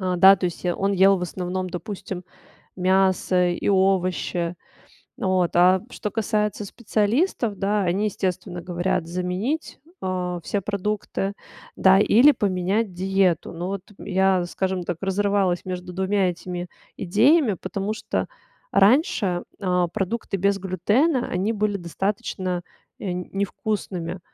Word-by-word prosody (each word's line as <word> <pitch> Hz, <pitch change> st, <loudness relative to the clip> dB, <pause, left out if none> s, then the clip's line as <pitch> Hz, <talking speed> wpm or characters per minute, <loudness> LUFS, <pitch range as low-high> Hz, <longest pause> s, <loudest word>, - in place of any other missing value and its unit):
Э, 185 Hz, -1 st, 0 dB
да, 190 Hz, +2 st, +8 dB
то 180 Hz, -, -5 dB
есть, 175 Hz, +1 st, -3 dB
э, 175 Hz, -, +2 dB
он 195 Hz, +1 st, 0 dB
ел 195 Hz, 0 st, +5 dB
в -, -, -5 dB
основном, 185 Hz, +1 st, -3 dB
допустим, 185 Hz, -1 st, -6 dB, 0.5 s
мясо 185 Hz, -1 st, +2 dB
и 175 Hz, -, -1 dB
овощи. 185 Hz, -2 st, +1 dB, 0.6 s
Вот, 185 Hz, -2 st, +1 dB
а 180 Hz, +1 st, +5 dB
что 210 Hz, -, -4 dB
касается 210 Hz, -2 st, -1 dB
специалистов, 220 Hz, -, 0 dB
да: 205 Hz, +1 st, +1 dB
они, 185 Hz, +4 st, 0 dB
естественно, 185 Hz, -2 st, -2 dB
говорят 180 Hz, 0 st, -1 dB
заменить, 185 Hz, -, -3 dB, 0.2 s
а, 180 Hz, -1 st, -2 dB
все 205 Hz, -, -1 dB
продукты, 200 Hz, 0 st, -2 dB, 0.4 s
да, 190 Hz, 0 st, +5 dB
или 245 Hz, +7 st, +6 dB
поменять 195 Hz, +1 st, 0 dB
диету. 185 Hz, -2 st, +1 dB
Но 175 Hz, +2 st, -4 dB
вот 200 Hz, -1 st, -3 dB, 0.2 s
я, 190 Hz, -2 st, +2 dB
скажем 185 Hz, 0 st, -2 dB
так, 170 Hz, -2 st, -3 dB
разрывалась 195 Hz, -2 st, +1 dB
между 180 Hz, -1 st, -5 dB
2 190 Hz, 0 st, +1 dB
этими 175 Hz, 0 st, -6 dB, 0.3 s
идеями, 215 Hz, -, +3 dB
потому 195 Hz, +3 st, -4 dB
что 220 Hz, -, -3 dB, 0.4 s
раньше, 205 Hz, -, +3 dB, 0.2 s
а, 180 Hz, -3 st, +1 dB
продукты 200 Hz, +2 st, -2 dB
без 200 Hz, +1 st, +1 dB
глютена, 220 Hz, -, +1 dB
они 195 Hz, +5 st, 0 dB
были 210 Hz, -1 st, 0 dB
достаточно, 185 Hz, 0 st, -3 dB, 0.4 s
э, 190 Hz, -, -3 dB
невкусными, 185 Hz, -1 st, -3 dB
190 Hz, 130 wpm, -23 LUFS, 180-205 Hz, 0.6 s, да